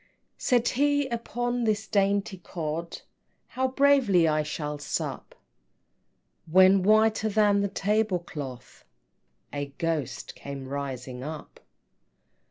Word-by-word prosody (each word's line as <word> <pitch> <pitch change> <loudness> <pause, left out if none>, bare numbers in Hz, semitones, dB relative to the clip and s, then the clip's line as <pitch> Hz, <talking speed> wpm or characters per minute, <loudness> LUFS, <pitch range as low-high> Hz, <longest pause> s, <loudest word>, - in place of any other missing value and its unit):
II. - - -39
Said 245 -2 +2
he, 285 +1 +2
"Upon 240 +1 -2
this 215 -1 0
dainty 200 -1 0
cod 165 -1 -5 0.5
How 260 +1 0
bravely 260 -10 +4
I 155 0 +2
shall 150 -1 -4
sup" 145 - -4 1.2
When, 190 +2 +6
whiter 215 +2 +3
than 205 -1 +3
the 200 - +1
tablecloth, 180 - -2 0.7
A 145 0 -3
GHOST 165 -5 -3
came 140 -1 -8
rising 130 -2 -5
up! 155 +1 -8
195 Hz, 105 wpm, -27 LUFS, 150-220 Hz, 1.2 s, When